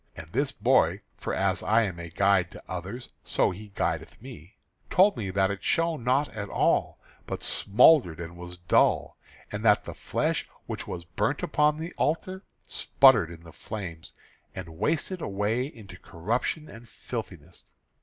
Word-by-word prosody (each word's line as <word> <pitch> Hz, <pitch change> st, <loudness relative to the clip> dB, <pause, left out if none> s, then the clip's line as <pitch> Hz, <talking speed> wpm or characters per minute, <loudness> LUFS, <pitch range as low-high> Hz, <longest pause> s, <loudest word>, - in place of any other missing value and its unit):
And 80 Hz, -, -8 dB
this 140 Hz, +4 st, 0 dB
boy, -, -, +2 dB
for -, -, -5 dB
as -, -, 0 dB
I 115 Hz, +2 st, +3 dB
am 95 Hz, -5 st, -4 dB
a 85 Hz, 0 st, -7 dB
guide 95 Hz, 0 st, +2 dB
to -, -, -11 dB
others 100 Hz, +7 st, -6 dB
so -, -, +1 dB
he 105 Hz, +4 st, -9 dB
guideth 80 Hz, 0 st, -2 dB
me, 105 Hz, -, -12 dB, 0.3 s
told 195 Hz, +3 st, +5 dB
me 105 Hz, -6 st, -4 dB
that 95 Hz, +1 st, +1 dB
it 100 Hz, -4 st, -6 dB
shone 165 Hz, -5 st, +1 dB
not 130 Hz, +4 st, +2 dB
at 105 Hz, -2 st, -6 dB
all, -, -, +1 dB, 0.3 s
but -, -, -4 dB
smouldered 105 Hz, -, +4 dB
and 85 Hz, 0 st, -7 dB
was 90 Hz, 0 st, -9 dB
dull, 85 Hz, -1 st, +2 dB, 0.3 s
and -, -, -4 dB
that -, -, +5 dB
the -, -, -7 dB
flesh -, -, -2 dB, 0.2 s
which -, -, -5 dB
was 85 Hz, -1 st, -6 dB
burnt 105 Hz, -, -1 dB
upon 150 Hz, 0 st, +2 dB
the 165 Hz, +3 st, -6 dB
altar 185 Hz, +5 st, -1 dB, 0.2 s
spluttered 120 Hz, -11 st, +4 dB
in 85 Hz, -1 st, -11 dB
the 85 Hz, -, -13 dB
flame, 90 Hz, -7 st, -7 dB, 0.5 s
and 90 Hz, -3 st, -6 dB
wasted 165 Hz, -, -1 dB
away 105 Hz, +5 st, -1 dB
into 100 Hz, -10 st, -12 dB
corruption 120 Hz, -, -2 dB
and 115 Hz, +1 st, -13 dB
filthiness. 90 Hz, -, -8 dB
105 Hz, 165 wpm, -27 LUFS, 90-130 Hz, 0.5 s, told